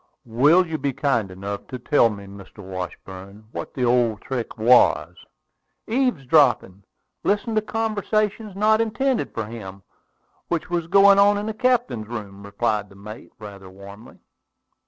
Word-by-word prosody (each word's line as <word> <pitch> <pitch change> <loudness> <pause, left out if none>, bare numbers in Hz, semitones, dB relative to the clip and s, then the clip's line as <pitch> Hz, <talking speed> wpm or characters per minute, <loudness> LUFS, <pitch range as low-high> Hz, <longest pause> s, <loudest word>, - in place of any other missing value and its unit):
"Will 145 +10 +4
you 160 -2 -4
be 140 -1 -2
kind 120 -8 0
enough 100 +2 -7
to 130 - -6
tell 125 -1 +3
me, 100 -2 -8
Mr. 100 +1 -13
Washburn, 95 +2 -8
what - - -7
the 125 - 0
old 120 -3 +1
trick 125 -3 -5
was?" 120 +3 +4 0.7
"Eavesdropping; 145 - +2 0.4
listening 210 +2 0
to 215 - +3
conversation 215 -1 -2
not 215 +2 +3
intended 235 +4 -1
for 110 - -4
him, 100 -4 -9 0.6
which 170 0 -3
was 170 -2 -1
going 200 +2 +6
on 205 +1 +5
in 205 - -3
the 220 - -3
captain's 235 - 0
room," 105 -4 -8
replied 105 0 -2
the 100 - -17
mate, 105 +3 -11
rather 100 -3 -11
warmly. 100 +3 -13
120 Hz, 145 wpm, -22 LUFS, -, 0.7 s, going